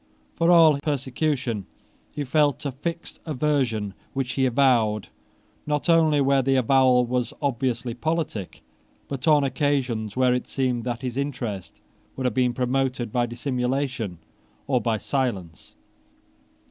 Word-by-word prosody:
For 165 0 +1
all 160 -4 +6
persecution 135 - -2 0.4
he 145 - -4
felt 145 0 +1
a 140 - -1
fixed 165 +6 -6
aversion, 130 - 0 0.2
which 135 -2 -2
he 130 -1 +2
avowed, 120 -5 +2 0.6
not 150 +3 -1
only 160 -3 +4
where 135 0 +3
the 135 +1 +1
avowal 130 0 +4
was 125 0 -2
obviously 130 -3 -1
politic, 155 - -3 0.4
but 135 0 -5
on 150 -2 +5
occasions 130 -6 -1
where 130 -1 +4
it 125 - -2
seemed 125 -3 -1
that 120 +1 -3
his 125 -1 -3
interest 125 -9 -4 0.3
would 130 - -4
have 125 - +1
been 125 0 +1
promoted 125 -2 -1
by 120 0 +1
dissimulation 125 -4 -2 0.5
or 130 -3 +1
by 110 0 0
silence. 105 - -3
130 Hz, 135 wpm, -24 LUFS, 120-140 Hz, 0.6 s, all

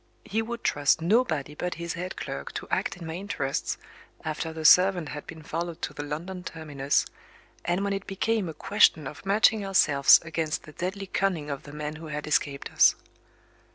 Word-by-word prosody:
He 220 +3 0
would 235 +1 -5
trust 145 +1 +3
nobody 165 - +1
but 180 +4 -3
his 170 -1 -4
head 180 +2 -5
clerk - - -6
to - - -5
act - - -1
in 170 - -8
my 160 - -5
interests, 170 -7 -2 0.5
after 160 +1 -3
the 160 -1 -6
servant 180 -1 +6
had 150 - -7
been 160 -1 -9
followed 165 +1 -4
to - - -2
the - - -5
London 170 +6 -5
terminus, 145 -5 -1 0.6
and 175 +3 0
when 200 0 0
it 195 0 -4
became 200 0 0
a 160 - -7
question 200 -7 +3
of 145 - -8
matching 215 +1 +4
ourselves 150 -8 +6
against 160 -1 -2
the 155 - -12
deadly 190 +4 -4
cunning 180 -6 -1
of 140 - -4
the 145 - -12
man 150 +1 -5
who 160 0 -9
had 150 -1 -4
escaped 140 -2 -1
us. - - +6
165 Hz, 190 wpm, -27 LUFS, 150-195 Hz, 0.6 s, servant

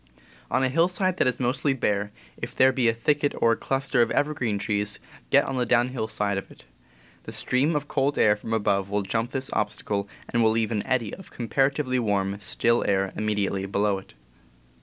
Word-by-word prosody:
On - - +1
a 130 - +2
hillside 180 +5 +1
that - - +2
is 125 -1 0
mostly 130 +3 +1
bare, 105 -4 -1 0.2
if - - -7
there 130 0 +5
be 130 -2 +1
a - - +5
thicket 145 +4 +1
or 115 - +4
a - - +3
cluster 135 0 0
of 120 - +3
evergreen 130 -8 0
trees, 105 -1 0 0.3
get - - +5
on 135 - -3
the 125 - +2
downhill 120 -1 +1
side 100 -2 -1
of - - -12
it. - - -17 0.6
The - - -7
stream 140 +5 +1
of 145 0 -2
cold 140 0 0
air 105 -1 +5
from 105 +1 -8
above 100 -3 +1
will 105 0 0
jump 115 +4 -1
this 135 0 -2
obstacle 100 -1 -1 0.2
and 120 - 0
will 110 - +5
leave 110 0 0
an 105 -2 0
eddy 120 -5 0
of 190 - -10
comparatively 135 +2 0
warm, 100 -3 0
still 115 +3 +1
air 95 -1 +1
immediately 100 -2 -1
below 100 0 0
it. 95 - -17
115 Hz, 200 wpm, -25 LUFS, 105-135 Hz, 0.6 s, there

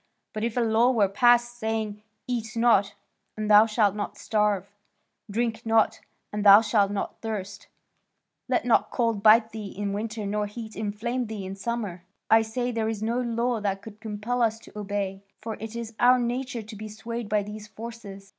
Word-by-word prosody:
But 215 - -3
if 235 +1 -2
a - - +3
law 230 +2 +3
were 220 -6 +3
passed 240 +3 +3
saying, 220 -2 -2 0.2
'Eat 235 -2 -3
not, 220 -4 +3 0.4
and 215 0 -1
thou 210 +2 +8
shalt 215 -3 +2
not 205 -1 -5
starve; 210 -3 0 0.6
Drink 225 +1 -1
not, 225 -1 +2 0.3
and 210 0 -2
thou 200 +1 +9
shalt 210 -2 +2
not 200 -1 -4
thirst; 205 -3 -5 0.8
Let - - +1
not - - +3
cold 230 -4 0
bite 220 +1 +6
thee 215 -2 -6
in 200 0 -4
winter 215 +1 -4
nor 210 +1 -1
heat 220 +1 -8
inflame 220 +4 -2
thee 210 -3 -6
in 190 +1 -6
summer,' 200 -4 -4 0.3
I 225 0 +7
say 245 +3 -2
there 225 -2 -1
is 215 -1 -4
no 230 +3 0
law 235 0 0
that 195 -1 -2
could 215 -1 -11
compel 220 +3 -3
us 225 -1 +2
to - - -16
obey; 200 -2 -3 0.2
for 220 0 -5
it 225 +1 -7
is 230 -1 -5
our 250 +1 +6
nature 245 -1 -2
to 215 +1 -10
be 215 +1 -7
swayed 220 +1 -6
by 210 -1 +2
these 210 +1 -8
forces. 215 -3 -9
220 Hz, 185 wpm, -26 LUFS, 205-230 Hz, 0.8 s, thou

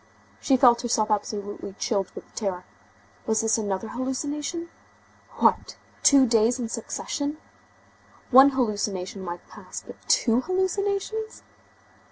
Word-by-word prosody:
She 265 - +3
felt 240 -2 +5
herself 225 -3 0
absolutely 205 -1 -3
chilled 195 -1 -1
with - - -11
terror. 190 -4 -3 0.6
Was 220 -1 +2
this 225 0 +2
another 205 0 -3
hallucination? 290 +6 -3 0.7
What! - - +2 0.3
Two 275 -2 +6
days 230 0 +3
in 240 -3 -4
succession! 285 +5 -4 0.9
One 265 +2 +9
hallucination 205 -7 -2
might 175 -1 -7
pass, - - -9
but - - -11
two 235 0 +3
hallucinations? 395 +5 -2
235 Hz, 115 wpm, -25 LUFS, 210-285 Hz, 0.9 s, One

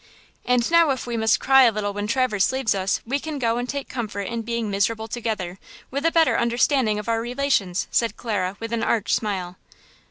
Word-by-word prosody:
"And 250 +2 +1
now 335 -2 +5
if 265 -2 -1
we 240 -1 -4
must 220 -1 +2
cry 270 0 +5
a 235 - +5
little 205 -1 -3
when 205 +1 -3
Traverse 240 -4 +1
leaves 260 -4 0
us, 190 -1 -1
we 270 +5 -1
can 310 0 -5
go 235 -2 0
and 245 +1 -4
take 280 -1 -4
comfort 215 -5 -4
in 230 +3 -4
being 235 0 -3
miserable 220 +3 0
together, 215 -6 -4 0.3
with 280 +4 0
a - - +2
better 325 -1 +3
understanding 235 -1 +2
of 210 +1 -6
our 225 0 +1
relations!" 240 -7 0
said 230 -2 +1
Clara 200 -5 -2
with 230 0 -5
an 230 - 0
arch 225 -3 0
smile. 185 -4 -2
230 Hz, 210 wpm, -23 LUFS, 210-255 Hz, 0.3 s, now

